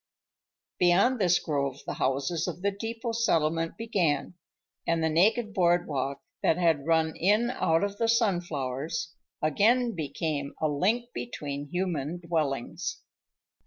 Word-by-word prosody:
Beyond 190 +8 +4
this 180 -2 +4
grove 140 -3 -2
the - - -3
houses 140 +6 -1
of 180 +1 -5
the 200 - +2
depot 225 +3 -4
settlement 165 -8 +1
began, 180 -11 0 0.5
and 165 -1 +1
the 160 - +2
naked 210 +6 +3
board 175 -2 +3
walk, 140 -1 -3 0.2
that 160 - +3
had 165 -5 +2
run 160 -1 +2
in 210 +7 +2
out 165 -9 +1
of 200 0 -3
the 230 - +2
sunflowers, 165 - -1 0.3
again 230 - +3
became 145 -2 -3
a 155 - +2
link 210 +12 0
between 145 -10 -5
human 175 -3 -2
dwellings. 155 -7 -2
170 Hz, 130 wpm, -28 LUFS, 150-200 Hz, 0.5 s, Beyond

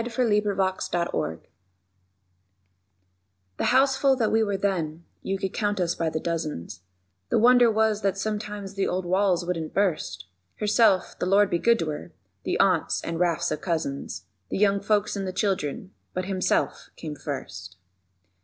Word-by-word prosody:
SONGS 235 0 -6
OF 245 -3 +2
HIMSELF 195 -2 +1 0.4
HIMSELF 80 +1 -2 2.2
The - - -1
houseful 270 +1 +4
that 230 -4 0
we 225 - +3
were 205 -3 0
then, 170 -5 -2 0.2
you 195 - -2
could 190 0 -3
count 205 -2 -1
us 175 -1 +1
by 165 -2 -1
the 155 - -2
dozens, 155 - -4 0.5
The - - +2
wonder 245 +1 +6
was 220 -1 +2
that 195 -1 0
sometimes 210 -1 -4
the 195 -1 0
old 185 0 -2
walls 185 -1 +2
wouldn't 165 -3 -3
burst: 180 - 0 0.3
Herself 210 -2 +2
(the 180 - -1
Lord 200 +1 +4
be 170 - +1
good 235 +4 +4
to 165 -7 -2
her!), 150 - -8 0.3
the - - -1
aunts - - +2
and 165 0 -3
rafts 175 -1 +1
of 155 - -3
cousins, 140 - -3 0.2
The - - -2
young 200 0 +3
folks 210 0 +1
and 195 -1 -3
the - - -2
children, 185 -2 -2 0.2
but 185 0 -2
Himself 190 -1 -1
came 155 -2 -6
first. 130 - -7
195 Hz, 165 wpm, -26 LUFS, 165-210 Hz, 2.2 s, wonder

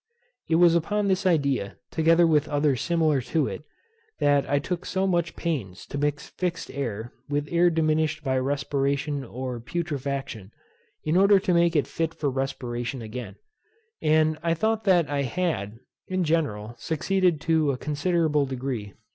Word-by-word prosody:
It 160 - +3
was 170 0 +6
upon 205 +5 +1
this 190 0 +1
idea, 140 - +1
together 165 +1 +4
with 155 -2 +3
others 145 -3 +1
similar 160 -5 +2
to 135 +5 0
it, - - -5 0.5
that 145 -2 +2
I 145 - +3
took 170 +5 -3
so 190 0 -1
much 175 -3 0
pains 120 - -3
to - - -6
mix 145 0 -1
fixed 180 -2 -3
air 120 -4 -4 0.2
with 145 0 -1
air 175 +1 +4
diminished 155 -1 +1
by 130 -2 +1
respiration 140 +1 -1
or 125 0 -5
putrefaction, 140 - -4 0.5
in 155 +3 +1
order 200 +1 +6
to 190 -2 +1
make 170 0 +3
it 145 - +3
fit 165 0 -3
for 145 -3 -1
respiration 125 -2 -3
again; 115 +3 -7 0.7
and 155 0 +3
I 165 0 +1
thought 220 +5 0
that 175 -5 +4
I 140 0 -1
had, 135 - -2 0.3
in 185 -1 0
general, 140 -10 -1
succeeded 175 +4 +1
to 160 -2 +2
a 135 - 0
considerable 150 0 +1
degree, 130 -4 -3
p. 100 - -13
150 Hz, 160 wpm, -26 LUFS, 135-170 Hz, 0.7 s, was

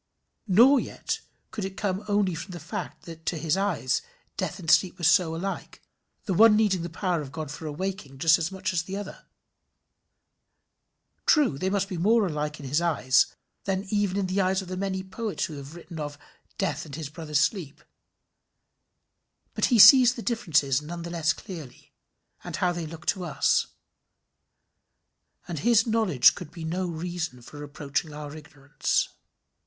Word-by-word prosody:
Nor 240 +8 +6
yet - - -4 0.3
could 210 - -5
it 190 0 -5
come 195 -1 -2
only 205 -3 +1
from 165 +3 -7
the 175 - -7
fact 155 - -6
that 165 -1 -10
to 170 - 0
his 155 +2 0
eyes 190 -10 0 0.3
death 180 - -3
and 170 -4 -1
sleep 185 -1 +4
were 175 - -10
so 170 0 +4
alike, 195 +4 -5 0.5
the 195 - -1
one 220 +4 +7
needing 205 -4 +2
the 170 - -4
power 175 -1 -1
of 135 -3 -8
God 155 -2 -5
for 155 +2 -7
awaking 160 -3 -5
just 160 +3 +4
as 165 +2 -2
much 190 -1 -3
as 170 - +1
the 190 +3 -6
other. 205 -1 -8 2.0
True 285 - +4
they 190 - 0
must 195 0 0
be 185 -3 -5
more 215 +4 +4
alike 150 -3 -3
in 145 - -9
his 145 +5 +1
eyes 145 -6 +3 0.4
than 195 0 -1
even 205 -2 +1
in 200 - 0
the 185 +2 0
eyes 190 0 +1
of 180 - -11
the 185 - -3
many 190 0 -2
poets 205 +2 -3
who 155 -4 -7
have 140 +3 -9
written 170 -1 -9
of 145 -1 -5 0.4
"Death 195 -3 -1
and 145 -4 -9
his 155 -2 -5
brother 155 0 -8
Sleep;" 150 0 0 1.7
but - - +1
he 245 - +3
sees 245 +4 +9
the 230 - -7
differences 150 - +1
none 170 +3 -7
the 170 - -6
less 165 -2 +1
clearly, 160 -9 -10 0.5
and - - -5
how 180 - +1
they 170 -2 -4
look 165 +2 -10
to 185 - 0
us, 160 - +1 1.8
and 165 -4 -4
his 230 +2 +4
knowledge 220 - +4
could 175 - -9
be 165 0 -9
no 180 +3 -2
reason 170 -6 -4
for 145 - -11
reproaching 145 +1 -4
our 150 0 -7
ignorance. 150 -2 -2
175 Hz, 175 wpm, -26 LUFS, 155-195 Hz, 2.0 s, sees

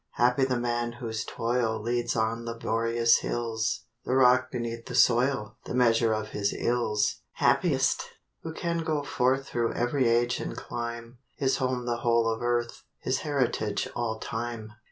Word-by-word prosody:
Happy 125 +2 +3
the 130 -2 0
man 120 0 -1
whose 115 -1 -4
toil 115 -2 -1
Leads 120 +2 -1
on 115 +1 0
laborious 115 0 +2
hills; 115 -2 -2 0.2
The 130 - 0
rock 130 0 +5
beneath 115 -2 -4
the 125 - -5
soil 120 -2 +3
The - - -4
measure 115 -2 +4
of 110 0 -2
his 100 -1 -1
ills. 115 -3 +1 0.2
Happiest, - - +2 0.4
who 160 - -5
can 170 +1 -2
go 155 -3 -1
forth 135 0 +1
Thro' 120 -1 0
every 120 +1 +1
age 120 +1 +2
and - - -5
clime, 120 0 -6 0.2
His 135 -1 +1
home 130 -2 -1
the 120 -1 -1
whole 115 -1 +2
of 110 - -7
earth, 120 0 -1 0.2
His 130 +1 -1
heritage 125 -8 -1
all 115 -2 -1
time. 110 -1 -5
120 Hz, 155 wpm, -28 LUFS, 115-125 Hz, 0.4 s, rock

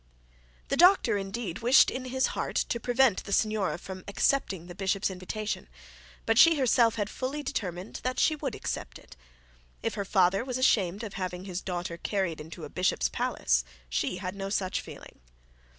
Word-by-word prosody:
The 275 - 0
doctor 350 - +6
indeed 195 -1 -4
wished 245 +3 +6
in 255 0 -5
his 260 +1 +1
heart - - -3
to 235 - 0
prevent 245 -2 +2
the - - -8
signora 215 -2 +1
from 185 +1 -9
accepting 200 -4 0
the 175 - -9
bishop's 195 +1 0
invitation; 185 - -4 0.6
but 225 +1 +3
she 330 0 +8
herself 240 -4 +3
had 205 -3 -1
fully 270 +6 -4
determined 185 -6 -4
that 255 0 -2
she 310 - +3
would 280 -6 -4
accept - - -5
it. - - -16 0.7
If - - -1
her 200 - -2
father 195 0 +3
was 255 -1 -3
ashamed 205 -5 +2
of 210 -3 -6
having 185 -1 -4
his 185 -1 -4
daughter 175 -2 -4
carried 185 -4 -2
into 160 +2 -9
a - - -5
bishop's 180 +4 +1
palace, - - 0 0.3
she 65 - -1
had 185 0 -4
no 195 -1 -5
such 190 -2 -1
feeling. - - -12
200 Hz, 175 wpm, -28 LUFS, 185-245 Hz, 0.7 s, she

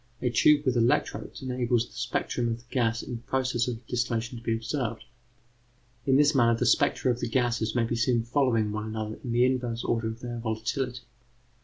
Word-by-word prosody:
A 125 - 0
tube 150 +3 +4
with 130 -2 +2
electrodes 120 +2 0
enables 125 -2 0
the - - -19
spectrum 125 -1 -2
of 115 -1 -1
the 120 - -19
gas 115 -3 +1
in 120 -2 -5
process 130 -1 -1
of 120 -1 -5
distillation 120 0 -2
to - - -17
be 115 - 0
observed. 115 0 -3 1.0
In 135 - +4
this 145 +2 +5
manner, 115 -4 +4
the - - 0
spectra 130 - +3
of 120 - -2
the - - -2
various 120 0 +1
gases 110 +1 -2
may 120 - +3
be 115 +1 -1
seen 115 0 +2
following 115 -4 +1
one 105 0 -3
another 110 0 -4
in 120 - -4
the 120 +1 +4
inverse 125 -3 -1
order 115 -1 0
of 110 +1 -6
their 120 -1 -5
volatility. 120 +3 -2
120 Hz, 200 wpm, -27 LUFS, 115-125 Hz, 1.0 s, this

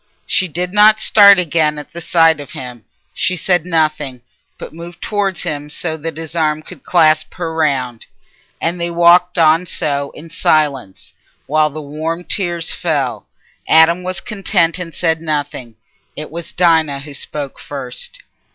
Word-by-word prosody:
She 185 - +1
did 180 +3 -3
not 215 +1 +6
start 200 -2 +7
again 155 -3 +1
at 150 - -9
the 170 - -7
sight 165 -2 +3
of 145 - -9
him; 125 -3 -9 0.3
she 185 - 0
said 180 -1 0
nothing, 155 -6 -1 0.4
but - - -9
moved 170 +1 -10
towards 200 -3 -2
him 145 0 -4
so 160 +2 -3
that 160 +1 -6
his 165 0 -6
arm 155 -1 0
could - - -13
clasp 155 -3 +2
her 165 -2 -4
round. 135 -7 -1 0.5
And 170 +1 -2
they 170 - -1
walked 175 +1 +4
on 165 +2 +4
so 140 -3 -1
in 160 +2 -11
silence, 145 -11 -1 0.3
while 155 +1 +2
the 155 +1 -8
warm 160 +4 -4
tears 175 -3 -2
fell. 145 -7 -2 0.4
Adam 160 +2 +5
was 185 0 -4
content, 190 -4 0
and 175 -2 -6
said 160 +1 0
nothing. 145 -7 -4 0.4
It 155 0 -7
was 170 +1 -7
Dinah 160 -5 +2
who 145 0 -10
spoke 140 0 -5
first. - - -8
160 Hz, 160 wpm, -16 LUFS, 150-175 Hz, 0.5 s, start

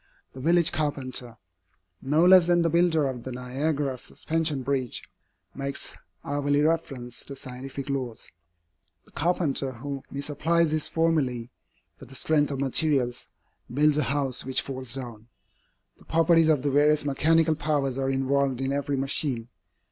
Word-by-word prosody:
The 130 - -9
village 170 +3 +4
carpenter, 130 -5 -3 0.6
no 150 +5 +3
less 180 -1 +7
than 175 -1 +3
the 165 - +1
builder 170 -3 +3
of 130 -2 -4
the 130 - -7
Niagara 135 +2 -2
Suspension 155 -2 -2
Bridge, 130 -2 -1 0.5
makes 140 0 -5 0.3
hourly 145 0 0
reference 135 -7 -2
to 140 - -7
scientific 135 +1 -7
laws. 130 -5 -4 0.8
The - - -20
carpenter 145 -4 -1
who 135 +3 -6
misapplies 150 +3 0
his 155 -1 -1
formulæ 135 -8 0 0.5
for - - -11
the 135 - -12
strength 145 0 +1
of 140 -2 -3
materials, 135 -2 +1 0.4
builds 150 +3 +3
a - - +2
house 140 -3 0
which 130 0 +1
falls 130 -2 -4
down. 120 -4 -8 0.7
The - - -19
properties 165 0 +4
of 145 -4 +2
the 145 - +1
various 150 +1 +3
mechanical 160 +3 +3
powers 145 -4 -1
are 135 0 0
involved 135 -1 +1
in 135 +1 -1
every 140 0 -1
machine. 130 -3 -2
140 Hz, 145 wpm, -26 LUFS, 130-155 Hz, 0.8 s, less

